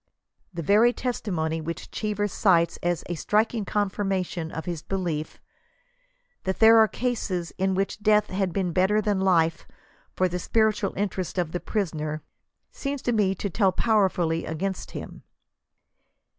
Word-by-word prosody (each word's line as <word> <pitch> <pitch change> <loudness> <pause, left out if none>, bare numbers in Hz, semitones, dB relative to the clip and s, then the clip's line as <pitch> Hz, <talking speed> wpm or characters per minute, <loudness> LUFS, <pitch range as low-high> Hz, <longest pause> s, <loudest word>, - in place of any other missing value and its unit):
The 170 -2 -5
very 215 +8 +5
testimony 175 -11 -2
which 165 +1 -6
Cheever 210 -1 -1
cites 175 -4 +2
as 175 -1 -1
"a 175 - -3
striking 215 +6 0
con 205 0 +1
21 - - -9 0.3
firmation^' 165 -2 -6
of 160 - -5
his 170 -3 -4
belief 170 -5 -3 0.5
'* - - -43
that 190 0 -1
there 225 0 +7
are 220 - +6
cases 205 -9 -2
in 190 0 +1
which 195 +2 -1
death 210 0 +3
had 190 -1 0
been 180 -2 -1
better 190 +4 +3
than 205 -2 0
life 165 -4 +2 0.5
for 185 - +2
the 180 0 -3
spiritual 215 0 +1
interests 190 -2 -2
of 175 -3 0
the 175 - -2
priso 200 -5 -2
ner," 155 0 -4 0.5
seems 280 -1 -4
to 245 - +1
me 205 -4 +2
to 200 - -3
tell 195 0 +3
powerfully 185 -6 +1
against 185 +4 -3
him. - - -8
190 Hz, 160 wpm, -26 LUFS, 170-215 Hz, 0.5 s, there